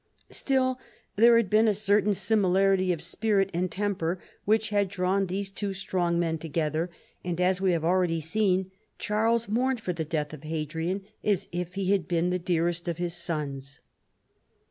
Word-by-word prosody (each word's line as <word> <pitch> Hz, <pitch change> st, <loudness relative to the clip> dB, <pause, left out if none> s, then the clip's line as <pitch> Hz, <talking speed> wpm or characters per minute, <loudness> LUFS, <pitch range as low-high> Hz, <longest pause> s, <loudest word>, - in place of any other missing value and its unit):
Still 260 Hz, -1 st, +1 dB, 0.4 s
there 230 Hz, +3 st, +7 dB
had 230 Hz, -3 st, +2 dB
been 215 Hz, +4 st, +4 dB
a 210 Hz, -, +3 dB
certain 205 Hz, 0 st, +2 dB
similarity 195 Hz, -2 st, +2 dB
of 170 Hz, -, -3 dB
spirit 200 Hz, -3 st, 0 dB
and 180 Hz, +2 st, 0 dB
temper 185 Hz, -3 st, -1 dB, 0.3 s
which 220 Hz, +1 st, +2 dB
had 205 Hz, -1 st, +2 dB
drawn 190 Hz, 0 st, 0 dB
these 195 Hz, +2 st, -3 dB
two 195 Hz, 0 st, -3 dB
strong 180 Hz, -2 st, 0 dB
men 165 Hz, -2 st, 0 dB
together, 160 Hz, +1 st, -1 dB, 0.3 s
and, 175 Hz, -1 st, -3 dB
as 180 Hz, +1 st, +2 dB
we 190 Hz, -1 st, +3 dB
have 165 Hz, -1 st, -1 dB
already 175 Hz, -1 st, +2 dB
seen, 185 Hz, +3 st, 0 dB, 0.3 s
Charles 225 Hz, +2 st, +1 dB
mourned 250 Hz, +4 st, +1 dB
for 185 Hz, -5 st, -3 dB
the 165 Hz, -1 st, -3 dB
death 150 Hz, -1 st, -3 dB
of 150 Hz, -, -9 dB
Hadrian 160 Hz, +4 st, -3 dB, 0.2 s
as 200 Hz, -2 st, +1 dB
if 175 Hz, +1 st, -4 dB
he 195 Hz, -1 st, 0 dB
had 200 Hz, -3 st, +1 dB
been 175 Hz, +1 st, +1 dB
the 180 Hz, -, 0 dB
dearest 170 Hz, 0 st, -1 dB
of 170 Hz, -2 st, -2 dB
his 175 Hz, -1 st, -2 dB
sons. 140 Hz, -4 st, -4 dB
185 Hz, 170 wpm, -27 LUFS, 170-205 Hz, 0.4 s, there